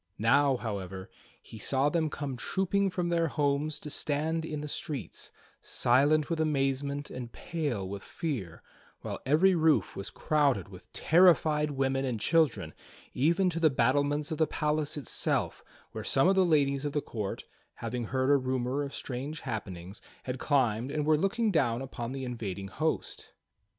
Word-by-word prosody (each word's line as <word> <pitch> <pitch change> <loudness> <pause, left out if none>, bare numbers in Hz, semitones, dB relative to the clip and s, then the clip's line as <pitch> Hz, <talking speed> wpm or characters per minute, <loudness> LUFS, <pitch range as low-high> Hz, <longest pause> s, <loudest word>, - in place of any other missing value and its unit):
Now, 135 +4 +4
however, 95 -5 -5 0.3
he 110 - -10
saw 135 +5 +2
them 160 0 0
come 145 -3 -4
trooping 195 +8 0
from 180 -2 -2
their 170 -1 +2
homes 145 0 0
to 150 - -6
stand 155 +3 -1
in 150 -2 -4
the*streets, 150 -1 -5 0.3
silent 145 +5 +3
with 165 -2 -2
amazement 140 -1 0
and 125 -2 -6
pale 140 - -3
with 100 +1 -6
fear, 120 - -5 0.4
while - - -5
every 170 +7 +5
roof 160 -2 +2
was 95 - -5
crowded 140 - +1
with - - -14
terrified 160 -3 +4
women 135 -1 0
and 125 -4 -2
children, 115 - +2 0.4
even 170 +8 +2
to 165 - -3
the 160 -2 +5
battlements 145 +4 +1
of 160 - -3
the 160 - +3
palace 150 -1 -1
itself 140 - -1 0.3
where - - -6
some 135 - +3
of 190 - +5
the 190 -1 +4
ladies 140 -4 +2
of 145 -1 -2
the 145 - +1
court, 105 -7 -5 0.3
having 115 +1 -4
heard 130 +3 +1
a 145 - +6
rumor 130 +1 -1
of 140 -1 -4
strange 140 +5 -5
happenings, 95 -6 -6 0.2
had 130 0 -4
climbed 125 -4 +1
and 150 +1 -1
were 155 0 +4
looking 205 +7 +1
down 120 -9 +2
upon 125 -3 -5
the 135 -1 -4
invading 100 -6 -5
host. 155 +10 -3
140 Hz, 160 wpm, -30 LUFS, 125-155 Hz, 0.4 s, a